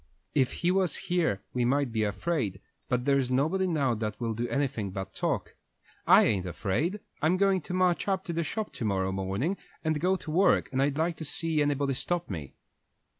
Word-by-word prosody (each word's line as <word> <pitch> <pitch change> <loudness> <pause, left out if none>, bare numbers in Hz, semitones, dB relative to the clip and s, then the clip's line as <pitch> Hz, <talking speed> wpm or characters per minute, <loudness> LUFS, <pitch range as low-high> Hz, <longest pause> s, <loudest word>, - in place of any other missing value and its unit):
If 130 -3 +2
he 175 - +5
was 185 -2 +1
here 160 - 0
we 125 - +1
might 135 +1 +1
be 110 -1 0
afraid, 110 - -1 0.3
but 125 0 0
there's 140 -2 +2
nobody 160 +9 +1
now 145 -8 +1
that 105 -1 -3
will 115 -2 -1
do 120 +2 -2
anything 135 -8 -1
but 95 0 -6
talk. - - -2 0.5
I - - +8
ain't 95 -4 +1
afraid. 120 - -1 0.2
I'm 165 +4 +3
going 195 -1 +3
to 180 - -7
march 185 0 +2
up 190 -1 0
to 170 - -4
the 165 - 0
shop 215 +6 -3
to - - -5
morrow 95 -3 0
morning 95 - -1 0.3
and 155 -2 0
go 185 +2 +3
to 165 -4 -6
work, 185 +5 +3
and 130 0 +1
I'd 140 +1 +1
like 165 +1 0
to - - -5
see 160 +1 0
anybody 145 -1 +1
stop 175 +2 -2
me." 75 -7 -6
140 Hz, 200 wpm, -29 LUFS, 110-175 Hz, 0.5 s, I